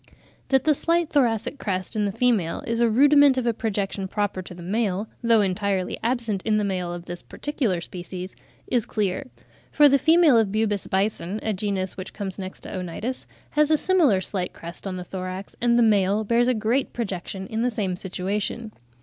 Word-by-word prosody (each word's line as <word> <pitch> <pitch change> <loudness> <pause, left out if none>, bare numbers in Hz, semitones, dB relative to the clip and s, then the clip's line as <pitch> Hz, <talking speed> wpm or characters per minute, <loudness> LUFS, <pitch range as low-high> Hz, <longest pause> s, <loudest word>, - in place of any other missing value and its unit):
That 265 -1 +3
the 310 - +4
slight 335 +2 +1
thoracic 250 -1 +1
crest 185 +1 -2
in 210 -1 +1
the 200 - 0
female 210 -7 +1
is 230 0 -1
a 235 -1 +4
rudiment 285 +3 +6
of 255 - 0
a 235 - +2
projection 200 -3 -2
proper 205 -1 -2
to 180 -1 -10
the 175 - -10
male, 205 +1 -1
though 230 -2 +4
entirely 195 -1 -1
absent 230 -4 -1
in 215 +1 +1
the 210 - +1
male 185 -3 -2
of 175 0 -7
this 175 -1 -7
particular 250 - -2
species, 180 +1 -7 0.3
is 240 -3 0
clear: 210 +6 -1 0.4
for 295 -1 +6
the 280 0 +4
female 320 -4 +5
of 215 -3 +1
Bubas 210 -2 0
bison 195 0 -1
(a 220 - 0
genus 190 -2 -2
which 185 0 -7
comes 200 -2 -5
next 190 0 -7
to - - -9
Onitis) 185 +8 -4 0.2
has 300 0 +3
a 310 - +4
similar 300 - +3
slight 185 -1 -3
crest 170 +4 -9
on 185 -1 -4
the 180 - -5
thorax, 185 +1 -6
and 240 0 +3
the 240 - +5
male 205 -1 +3
bears 235 +3 +2
a 255 - +2
great 225 +5 0
projection 190 -4 -4
in 220 +3 -3
the 245 - +2
same 200 -6 -2
situation. 200 +5 -3
210 Hz, 195 wpm, -24 LUFS, 190-240 Hz, 0.4 s, rudiment